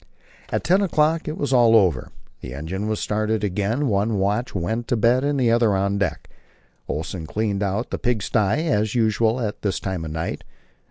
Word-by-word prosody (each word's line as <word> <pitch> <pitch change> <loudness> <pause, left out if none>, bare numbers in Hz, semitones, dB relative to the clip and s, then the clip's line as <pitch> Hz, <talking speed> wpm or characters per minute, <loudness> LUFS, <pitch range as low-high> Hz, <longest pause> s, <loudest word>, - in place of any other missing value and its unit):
At - - -1
ten 185 +4 +3
o'clock 160 -3 +1
it 155 - -3
was 140 -2 -1
all 120 -2 +5
over, 90 - +3 0.3
the 60 - -8
engine 95 +8 -4
was 110 -1 -1
started 110 0 -1
again, 105 +8 0
one 105 0 +1
watch 105 +6 -1
went 110 +7 -2
to 120 - +1
bed 120 +4 +3
and 145 -1 0
the 120 -3 +3
other 115 -3 +3
on 100 +1 0
deck; 95 -6 -2 0.6
Olsen 80 +1 -4
cleaned 105 0 -1
out 100 +4 -2
the - - -3
pigsty, 115 - 0
as 105 -6 0
usual 115 +1 +2
at 110 -3 -3
this 100 -2 -1
time 95 -4 -3
of 80 - -5
night. 80 +2 -4
110 Hz, 185 wpm, -22 LUFS, 100-120 Hz, 0.6 s, all